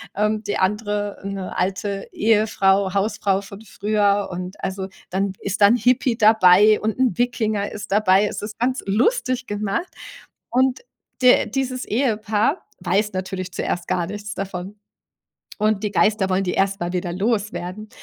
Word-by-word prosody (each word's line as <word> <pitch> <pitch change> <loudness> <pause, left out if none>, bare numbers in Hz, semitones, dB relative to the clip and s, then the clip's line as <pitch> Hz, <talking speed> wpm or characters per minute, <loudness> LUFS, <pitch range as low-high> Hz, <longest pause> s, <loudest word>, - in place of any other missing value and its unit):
ähm, 215 +1 0
die 205 - -2
andere 205 +1 -1
'ne 195 -1 -5
alte 195 +2 -2
Ehefrau 200 -3 +2
Hausfrau 200 -1 0
von 200 0 -11
früher. 205 -1 0
Und 180 +2 -7
also, 190 0 -3 0.2
dann 195 +1 -1
ist 200 +1 -3
dann 205 +3 +7
Hippie 245 0 +2
dabei 210 -1 +6
und 220 +2 -2
'n 255 -3 +2
Wikinger 220 -4 0
ist 210 0 -8
dabei. 200 -1 +4
Es - - -5
ist 215 +1 -7
ganz 255 +2 0
lustig 255 - +1
gemacht. 205 - -2 0.6
Und 260 - +2 0.4
de 250 - +6
dieses 255 +1 -2
Ehepaar 220 - 0 0.2
weiß 210 +1 +1
natürlich 185 -1 -4
zuerst 175 0 -3
gar 180 -2 0
nichts 205 +2 -6
davon. 195 +1 -6 0.8
Und 215 -1 +1
die 210 - 0
Geister 210 -2 +2
wollen 190 +1 +1
die 180 - -1
erst 195 0 +1
mal 175 0 -2
wieder 175 -1 -2
loswerden. 210 -1 -2
205 Hz, 150 wpm, -22 LUFS, 195-220 Hz, 0.8 s, dann